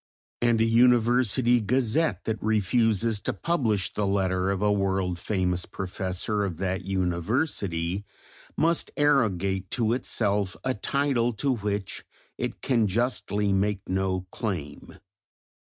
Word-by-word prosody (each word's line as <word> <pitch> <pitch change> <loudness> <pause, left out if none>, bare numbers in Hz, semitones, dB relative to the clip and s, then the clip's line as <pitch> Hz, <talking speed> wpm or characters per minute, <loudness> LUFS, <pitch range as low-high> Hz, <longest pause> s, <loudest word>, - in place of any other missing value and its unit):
And 120 -1 +3
a 115 - +4
University 120 +1 +4
Gazette 125 - +1
that 110 -1 -2
refuses 110 +1 +1
to - - -3
publish 110 - 0
the 105 -1 -1
letter 95 -1 +1
of 100 -1 0
a 105 - +3
world 95 -3 0
famous 90 -2 -1
professor 95 +2 -3
of 90 -5 -3
that 95 +1 -2
University, 95 - -1 0.5
must 165 +1 +1
arrogate 100 -10 +1
to 115 -3 0
itself 105 -6 0
a 130 - 0
title 125 0 0
to 135 +5 0
which 100 -2 -4 0.4
it - - -4
can 115 -5 +2
justly 105 -2 0
make 100 0 0
no 95 0 0
claim. 85 -11 -5
105 Hz, 120 wpm, -26 LUFS, 95-120 Hz, 0.5 s, a